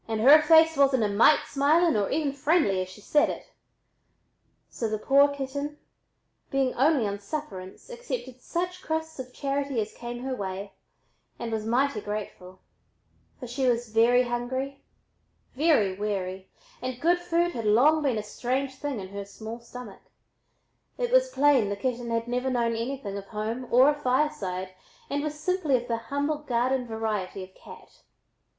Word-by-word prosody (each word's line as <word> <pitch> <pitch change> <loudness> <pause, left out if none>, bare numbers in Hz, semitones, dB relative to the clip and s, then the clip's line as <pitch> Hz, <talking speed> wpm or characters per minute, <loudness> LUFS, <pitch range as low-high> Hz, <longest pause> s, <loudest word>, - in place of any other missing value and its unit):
"And 220 -1 -2
her 290 +6 +8
face 320 +1 +6
wasn't 270 -4 +4
a - - +2
mite 220 +9 +5
smiling 310 +3 +3
or 205 -2 +1
even 290 -2 0
friendly 280 - +2
as 185 - -5
she 200 +3 -13
said 295 +7 +3
it." - - -6 1.2
So 225 - -4
the 215 - -1
poor 275 +6 +4
little 285 - -6
kitten, 280 +2 -4 0.7
being 270 -2 +1
only 275 -2 +3
on 200 0 -3
sufferance, 200 -5 -7
accepted 480 - -6
such 360 +1 -3
crusts 320 -2 -3
of 255 -1 -7
charity 275 -1 -2
as 215 0 -3
came 240 +1 -7
her 265 0 -2
way, 195 -1 -5 0.6
and 230 - -5
was 220 -1 -3
mighty 245 -1 +1
grateful; 200 -3 -7 0.8
for 260 - -7
she 255 +2 -1
was 240 -1 +1
very 235 +3 +4
hungry, 260 +3 -3 0.7
very 275 - +3
weary, 190 -2 -4 0.3
and 255 -1 -4
good 345 +4 +3
food 345 0 0
had 230 -6 -5
long 270 +9 +4
been 270 -6 +1
a 210 - -2
strange 260 +5 -2
thing 280 -4 -4
in 190 -1 -7
her 200 +1 -6
small 220 +3 -8
stomach. 235 -3 -11 1.0
It 485 -1 -1
was - - +4
plain 280 - +3
the 200 - -2
kitten 240 +2 -3
had 230 0 -1
never 250 +2 -1
known 235 -2 0
anything 230 -4 -4
of 195 - -11
home 225 +4 -4
or 255 +3 +6
a 295 - +5
fireside 250 -10 -1 0.4
and 285 +1 0
was 300 0 -4
simply 315 -4 +1
of 245 0 -7
the 230 -2 0
humble 285 +2 -1
garden 255 -2 0
variety 215 -4 -3
of 185 0 -13
cat. - - -15
250 Hz, 170 wpm, -27 LUFS, 215-290 Hz, 1.2 s, her